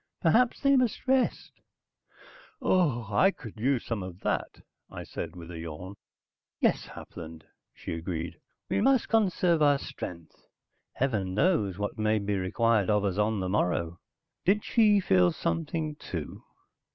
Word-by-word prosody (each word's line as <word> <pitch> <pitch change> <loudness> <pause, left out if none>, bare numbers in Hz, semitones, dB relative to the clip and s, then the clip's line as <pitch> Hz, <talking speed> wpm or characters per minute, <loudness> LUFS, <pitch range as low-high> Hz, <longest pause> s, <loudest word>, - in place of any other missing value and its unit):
"Perhaps 235 +8 +3
they 275 -1 +4
must 255 -1 0
rest." 260 -1 +1 1.1
"I 135 - +2
could 115 -5 -10
use 130 +1 +1
some 115 -4 -2
of 90 0 -8
that," - - -2 0.3
I - - -7
said 85 +1 -6
with 85 -1 -9
a 85 - -7
yawn. 85 +4 -7 0.7
"Yes, - - +1
Hapland," 80 -1 -10 0.3
she - - -6
agreed. 85 0 -4 0.3
"We - - 0
must 265 -1 +3
conserve 180 -6 +2
our 145 -1 +5
strength. 85 -10 -9 0.5
Heaven 105 -8 -1
knows 105 - +2
what 105 +2 -4
may 110 0 +2
be 100 0 -1
required 105 +3 +1
of 105 -1 +2
us 100 0 -1
on 105 -1 +1
the 95 - -2
morrow." 85 -3 0 0.4
Did 205 +3 +2
she 210 -3 +4
feel 90 - +4
something, 85 - -2
too? 80 - -6
105 Hz, 140 wpm, -28 LUFS, -, 1.1 s, our